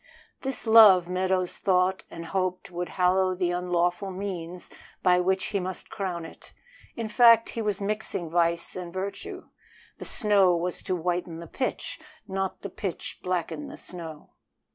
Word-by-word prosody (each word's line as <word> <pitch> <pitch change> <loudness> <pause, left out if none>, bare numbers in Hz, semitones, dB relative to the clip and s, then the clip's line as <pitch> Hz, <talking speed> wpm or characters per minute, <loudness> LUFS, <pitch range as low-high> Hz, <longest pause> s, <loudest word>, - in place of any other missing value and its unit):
This 270 -2 0
love 215 -6 +8
Meadows 185 0 0
thought 185 0 +2
and 165 0 -8
hoped 185 +1 -2
would 175 0 -4
hallow 185 0 +2
the 180 -1 0
unlawful 180 +1 0
means 180 -2 -6 0.3
by 180 -1 +5
which 190 +1 +1
he 200 - +2
must 185 0 -5
crown 185 -6 -3
it. - - -13 0.4
In 230 -1 -3
fact, 230 0 +6
he 230 - -4
was 210 -3 -1
mixing 205 -4 -2
vice 170 0 +1
and 180 -2 -6
virtue. 190 +2 -6 0.5
The - - -6
snow 200 -5 +4
was 175 +1 -3
to 185 - 0
whiten 175 -1 -2
the 170 - -8
pitch, 330 - -3 0.3
not 190 -1 -3
the 200 - -4
pitch 190 -1 -5
blacken 185 - -2
the 290 - -9
snow. 165 -4 -9
185 Hz, 155 wpm, -27 LUFS, 175-200 Hz, 0.5 s, love